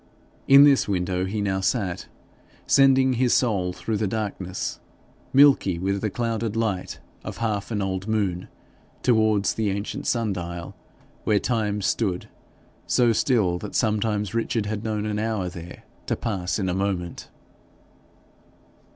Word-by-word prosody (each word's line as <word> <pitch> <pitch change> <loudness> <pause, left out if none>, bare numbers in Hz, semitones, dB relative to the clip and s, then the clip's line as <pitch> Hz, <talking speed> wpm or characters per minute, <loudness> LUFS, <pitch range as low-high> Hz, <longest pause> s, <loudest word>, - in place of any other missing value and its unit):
In 140 +1 +9
this 140 -2 +5
window 90 -1 -1
he 105 +2 -3
now 95 -2 0
sat, 95 -3 -1 0.6
sending 135 -1 +5
his 125 0 +2
soul 100 -8 +1
through 110 +4 -3
the 105 0 0
darkness, 95 -3 -4 0.5
milky 135 -10 +5
with 95 +2 -1
the 110 - 0
clouded 115 0 -2
light 110 -5 -2 0.2
of - - -6
half 105 -3 -2
an 105 -3 -1
old 95 +1 -3
moon, 100 -5 -1 0.6
towards 110 -4 +3
the 110 -2 -1
ancient 100 +2 -4
sun 115 -4 +1
dial, 85 -1 -6 0.5
where 105 - +2
Time 105 -3 -1
stood 95 -3 -1 0.6
so 120 -2 +3
still 105 -8 +1
that 105 - -7
sometimes 105 -2 0
Richard 115 -1 -1
had 105 0 -3
known 110 -1 -2
an 105 -1 -2
hour 110 -4 -1
there 90 -1 -10 0.4
pass 95 -6 -2
in 95 -3 -1
a 90 - 0
moment. 95 -2 -3
105 Hz, 140 wpm, -24 LUFS, 95-115 Hz, 0.6 s, In